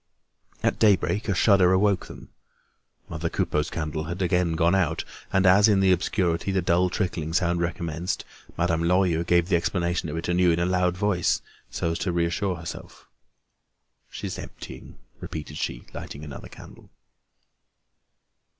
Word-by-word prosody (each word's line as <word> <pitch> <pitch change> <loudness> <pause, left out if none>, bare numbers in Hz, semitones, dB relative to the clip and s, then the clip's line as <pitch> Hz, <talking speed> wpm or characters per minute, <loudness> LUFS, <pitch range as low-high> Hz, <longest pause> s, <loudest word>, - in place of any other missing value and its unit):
At - - +1
daybreak, 105 +1 +2
a 95 - +1
shudder 95 -2 +5
awoke 95 0 +2
them. - - -11 0.8
Mother 85 +2 -3
Coupeau's 75 0 -1
candle 80 -1 -3
had 85 +3 -5
again 90 -2 +1
gone 85 +2 +2
out; 85 -4 +1 0.3
and 95 0 +2
as, 100 +3 +6
in 105 -3 +4
the 95 -1 +4
obscurity, 90 0 0
the 95 - +1
dull 90 +1 +2
trickling 85 -5 -2
sound 85 0 +1
recommenced, 85 0 -3 0.3
Madame 85 -1 +1
Lorilleux 85 -1 +2
gave 85 0 +2
the 90 - +3
explanation 85 -1 -1
of 80 - -4
it 80 - -4
anew 90 0 +3
in 85 0 +2
a 85 - +1
loud 90 -1 +1
voice, 100 -3 +1 0.3
so 85 - -2
as 80 - -3
to 90 - -1
reassure 85 +3 0
herself: 85 0 -9 1.0
"She's - - -6
emptying," - - -10 0.2
repeated 75 -1 -7
she, - - -4
lighting 70 - -7
another 75 -3 -9
candle. - - -14
85 Hz, 150 wpm, -25 LUFS, 85-95 Hz, 1.0 s, as